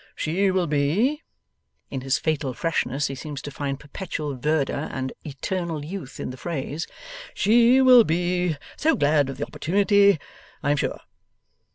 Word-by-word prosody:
She 190 +5 +1
will 185 -1 +1
be,' 170 - +1 0.7
in 135 - -3
his 135 +1 +1
fatal 145 -5 -1
freshness 145 -4 -1
he 135 - -2
seems 145 +1 -6
to 145 - -6
find 140 -1 -3
perpetual 150 -2 -5
verdure 145 +2 -1
and 130 -1 -4
eternal 160 +1 -4
youth 165 -6 -7
in - - -4
the 130 - -9
phrase, 155 +1 -4 0.5
'she 235 +5 +5
will 250 -2 +8
be 175 -1 0 0.2
so 320 0 +3
glad 145 - +2
of 135 - -6
the - - -2
opportunity, 200 0 +3 0.4
I 145 - +2
am 145 - +2
sure! - - -2
155 Hz, 155 wpm, -24 LUFS, 140-190 Hz, 0.7 s, will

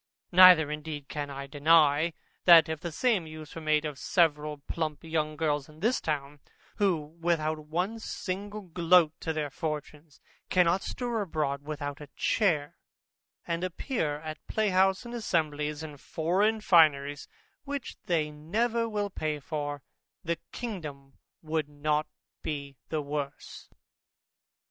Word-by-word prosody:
Neither 180 -4 +8
indeed 150 -2 -5
can 145 -1 -4
I 140 0 -6
deny, 150 +2 +4 0.3
that 170 -2 +9
if 160 -1 -3
the 170 0 -5
same 205 -2 +1
use 155 -1 -9
were 165 - -7
made 155 0 +2
of 145 -2 -5
several 150 -4 +1
plump 155 +2 -4
young 155 -2 -1
girls 150 -3 0
in 155 0 -16
this 230 +7 +1
town, 145 -1 -3 0.4
who 165 -6 0
without 160 -2 +1
one 180 +8 -1
single 205 0 -5
groat 175 -2 +4
to 165 - -2
their 150 -3 -2
fortunes, 150 0 -5 0.3
cannot 180 +1 +3
stir 240 -3 -2
abroad 150 -7 -2
without 145 -1 -5
a 145 - -10
chair, 160 -9 +1 0.7
and 170 +1 -2
appear 185 - -2
at 155 0 -6
a - - -11
playhouse 195 0 +2
and 240 - -7
assemblies 150 -8 -1
in 150 -2 -8
foreign 195 +10 0
fineries 145 -6 +4 0.4
which 280 -2 -5
they 155 -3 +1
never 225 +10 -1
will 205 -2 -2
pay 155 -4 -2
for, 145 -3 -4 0.4
the 170 0 -2
kingdom 150 - -6 0.3
would 155 -1 -1
not 150 +1 0 0.3
be 140 -2 -4
the 155 -2 -1
worse. 145 -1 -5
155 Hz, 140 wpm, -29 LUFS, 150-180 Hz, 0.7 s, that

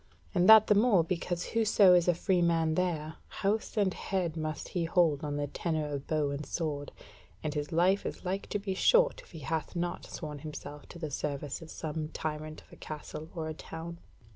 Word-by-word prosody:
And 180 +3 +4
that 220 -1 +10
the - - +5
more 205 -4 +5
because 175 +1 -2
whoso 215 -4 +5
is 175 -1 +4
a 175 - +4
free 180 +1 +1
man 165 -2 +2
there, 160 -3 -1
house 215 +3 -1
and 195 -3 +3
head 180 -4 -2
must 155 -2 -4
he 175 -2 -1
hold 165 -4 +2
on 145 -1 -2
the 145 - 0
tenure 155 +2 -2
of 140 -1 -4
bow 150 -2 +1
and 140 +1 -3
sword, 150 -3 -3 0.5
and 155 -1 -2
his 150 +1 -3
life 180 +4 +3
is - - -6
like 190 +2 -2
to - - -1
be 200 -1 -3
short - - +4
if - - -20
he 160 - -10
hath 155 +3 -3
not 175 0 -3
sworn 150 -2 -6
himself 150 -1 -8
to - - -10
the 155 -3 -5
service 140 +1 -3
of 165 - -10
some 155 -1 -4
tyrant 155 0 -5
of - - -20
a - - -12
castle 155 +1 -7
or 160 -2 -3
a 155 - -3
town." 165 +2 -8
165 Hz, 210 wpm, -31 LUFS, 155-180 Hz, 0.5 s, that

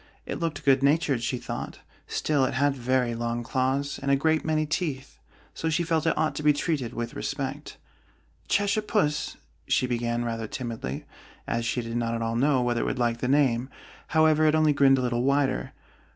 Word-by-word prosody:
It - - -4
looked 155 -3 -3
good 135 -1 +5
natured, 140 -3 +2
she 125 +2 -1
thought: - - -6 0.3
still 145 -3 +1
it 130 - 0
had 140 +1 +2
very 125 -1 0
long 120 +1 -2
claws 135 +3 -1
and 140 - -2
a 140 - +5
great 160 +3 +1
many 155 -1 +1
teeth, 150 -4 -3 0.3
so 160 - -2
she 160 +2 +1
felt 165 -1 0
it - - +1
ought 155 0 +1
to - - -3
be 150 0 +5
treated 145 -5 -1
with 120 0 -4
respect. - - -4 0.7
"Cheshire 205 +1 +2
Puss," 205 -9 0 0.3
she - - +2
began, 120 -1 -1
rather 115 -1 -3
timidly, 115 - -5 0.4
as 115 0 -1
she 120 0 -1
did 115 +1 -4
not 115 -1 -1
at 115 - -2
all 115 0 -1
know 130 +1 +3
whether 120 -1 0
it - - -1
would - - -2
like 120 -1 0
the 125 - -1
name: 130 -2 +2 0.4
however, 155 -1 +4
it 155 - +4
only 155 -1 +4
grinned 135 -1 +5
a - - 0
little 120 -1 0
wider. 140 +1 +1
135 Hz, 195 wpm, -26 LUFS, 120-155 Hz, 0.7 s, good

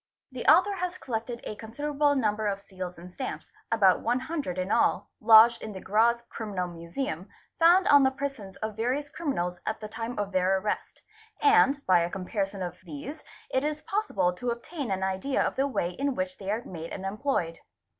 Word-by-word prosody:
The 255 -2 -6
author 360 +8 +6
has 360 0 -3
collected 235 -2 -4
a - - -5
consider 235 +8 -5
able 290 0 +3
number 215 -4 0
of 200 -1 -1
seals 185 -2 -7
and 175 +1 -11
stamps, 260 - -6 0.2
about 195 -5 +5
one 240 +2 +1
hundred 270 - -3
in 185 +2 -2
all, - - +2
lodged 225 +1 +7
in 215 - -6
the 190 - -7
Graz 225 +5 +3
Criminal 200 -5 -4
Museum, 175 - -5 0.3
found 350 +3 +6
on 285 0 +7
the 265 - +5
persons 265 -8 -5
of 220 -1 -3
various 260 +6 -1
criminals 180 - -2
atl 220 - -1
the 215 - -6
time 225 +3 -5
of 205 -1 -2
their 185 0 +2
arrest, 210 +2 -4 0.4
and 355 -10 +4
by 185 -2 +5
a 170 0 0
comparison 195 +1 -3
of 180 0 -6
these 180 - -8 0.3
it 260 - +1
is 305 +1 -2
possible 205 - 0
to. 245 +7 -4
obtain 250 +3 -4
an 190 -1 -1
idea 190 +8 -1
of - - +1
the 270 +1 +1
way 175 -10 -1
in 275 +6 -2
which 275 0 -3
they 195 -1 -6
are 220 +4 -1
made 165 -2 -7
and 195 - -6
employed. 195 -5 -1
220 Hz, 195 wpm, -28 LUFS, 190-275 Hz, 0.4 s, lodged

